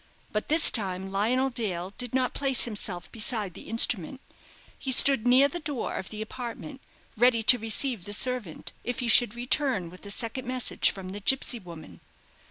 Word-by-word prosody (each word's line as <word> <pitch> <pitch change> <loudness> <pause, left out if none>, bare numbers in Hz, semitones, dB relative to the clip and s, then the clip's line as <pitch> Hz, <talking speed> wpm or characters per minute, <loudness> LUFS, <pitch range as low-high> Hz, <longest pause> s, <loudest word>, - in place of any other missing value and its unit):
But 215 - -3
this 315 +2 +7
time 190 -3 0
Lionel 250 +7 0
Dale 195 -6 -4
did 250 0 -6
not 255 -1 0
place 270 -2 -1
himself 205 -6 -5
beside 215 -4 -2
the 195 - -12
instrument. 230 0 +1 0.6
He 265 - -4
stood 255 -2 +6
near 260 +3 +5
the 345 +5 -6
door 295 -7 -4
of 190 - -6
the 215 0 -6
apartment, 250 +4 -8 0.3
ready 235 0 +3
to 245 +2 +6
receive 225 -1 0
the 205 - -6
servant, 240 -7 -1
if 245 0 -4
he 245 - -3
should 235 0 +4
return 245 - -1
with 180 - -15
a 200 - -9
second 235 +4 -4
message 255 -1 +1
from 190 -2 -7
the 200 +2 -7
gipsy 245 +3 0
woman. 160 - -12
230 Hz, 180 wpm, -26 LUFS, 200-255 Hz, 0.6 s, this